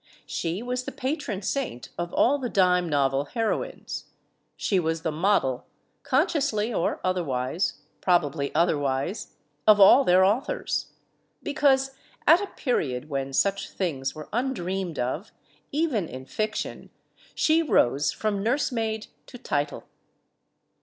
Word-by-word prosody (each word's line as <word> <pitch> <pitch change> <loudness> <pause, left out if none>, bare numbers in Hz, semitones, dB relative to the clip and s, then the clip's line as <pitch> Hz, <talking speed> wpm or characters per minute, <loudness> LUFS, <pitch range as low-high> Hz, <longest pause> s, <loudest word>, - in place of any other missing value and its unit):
She 175 +6 -3
was 250 +1 -3
the - - -4
patron 260 - -3
saint 215 - -3
of 175 0 -4
all 285 +4 +3
the 250 -2 -3
dime 180 -3 +3
novel 140 -1 +1
heroines; 225 - -3 0.5
she 195 - +1
was 160 -1 -1
the 160 - 0
model, 155 -6 +1 0.3
conciously 270 - +1
or 170 - 0
otherwise 165 -4 -1 0.2
probably 150 -5 +1
other 165 -3 +3
wise 140 +8 -2 0.3
of 210 -1 +7
all 225 +7 +8
their 185 -3 +5
authors. 255 - 0 0.6
Because, 270 -2 +2 0.3
at 330 +5 +7
a 405 - -3
period 150 - -2
when 135 -1 -2
such 200 +8 +1
things 140 -8 -3
were 155 -1 -8
undreamed 190 - -2
of, 130 - -3 0.4
even 280 - 0
in 130 +1 -8
fiction, 215 +9 -3 0.5
she 320 +1 +3
rose 145 - +2
from 210 -2 -2
nursemaid 225 -2 0 0.2
to 245 - -10
title. 145 - -2
195 Hz, 125 wpm, -26 LUFS, 150-250 Hz, 0.6 s, all